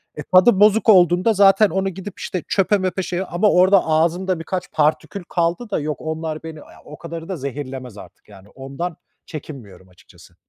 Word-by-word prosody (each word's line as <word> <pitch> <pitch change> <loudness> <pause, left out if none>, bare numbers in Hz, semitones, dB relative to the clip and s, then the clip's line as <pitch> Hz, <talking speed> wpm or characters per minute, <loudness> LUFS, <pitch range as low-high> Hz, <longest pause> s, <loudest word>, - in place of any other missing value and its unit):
E, 150 - -7
tadı 185 - +4
bozuk 215 +2 +4
olduğunda 180 +2 +4
zaten 200 +1 +5
onu 190 +3 -1
gidip 190 +2 -9
işte 180 -4 -5
çöpe 200 +1 +1
möpe 190 0 -2
şeye 180 +1 -3
ama 195 +4 +1
orada 185 +2 +4
ağzımda 170 +3 0
birkaç 180 +2 -5
partikül 160 +5 -1
kaldı 175 +7 -1
da - - 0
yok, 150 -1 -5
onlar 160 0 -5
beni, 160 -1 -8
ya, - - -15 0.2
o 150 - -11
kadarı 165 +1 -8
da 185 - -4
zehirlemez 130 -4 -7
artık 105 - -15
yani, 100 0 -16
ondan 140 +6 -7 0.3
çekinmiyorum 115 - -11
açıkçası. 90 - -20
170 Hz, 175 wpm, -20 LUFS, 150-190 Hz, 0.3 s, zaten